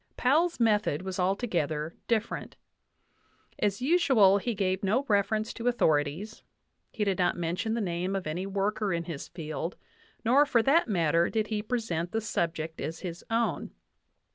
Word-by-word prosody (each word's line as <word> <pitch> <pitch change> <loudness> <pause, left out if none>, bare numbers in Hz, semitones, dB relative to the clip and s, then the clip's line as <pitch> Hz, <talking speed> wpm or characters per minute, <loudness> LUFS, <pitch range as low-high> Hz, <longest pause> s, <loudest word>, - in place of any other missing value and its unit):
Powell's 320 +6 +2
method 210 -8 +2
was 190 0 -4
altogether 175 -6 -1
different. 230 -1 -1 1.0
As 205 +1 0
us\ial, 255 - +5
he 235 0 -2
gave 190 -1 0
no 220 +8 +1
refer 205 0 +2
ence 215 +1 -3
to 235 - -4
authorities; 165 -2 +1 0.5
he 220 - -2
did 195 -3 0
not 180 - +2
mention 175 +6 -1
the 235 - -1
name 180 0 -2
of 195 - -3
any 175 +5 -3
worker 200 +1 -1
in 170 -1 -1
his 165 -4 -6
field; 165 0 -5 0.5
nor, 260 +6 +6
for 235 -5 +3
that 290 +5 +4
matter, 170 -4 +2
did 220 -2 -1
he 215 -2 -1
present 210 -7 -2
the 225 - +1
subject 165 -6 -2
as 160 +2 -4
his 175 -2 -6
own. 230 +1 -1
195 Hz, 160 wpm, -29 LUFS, 170-225 Hz, 1.0 s, nor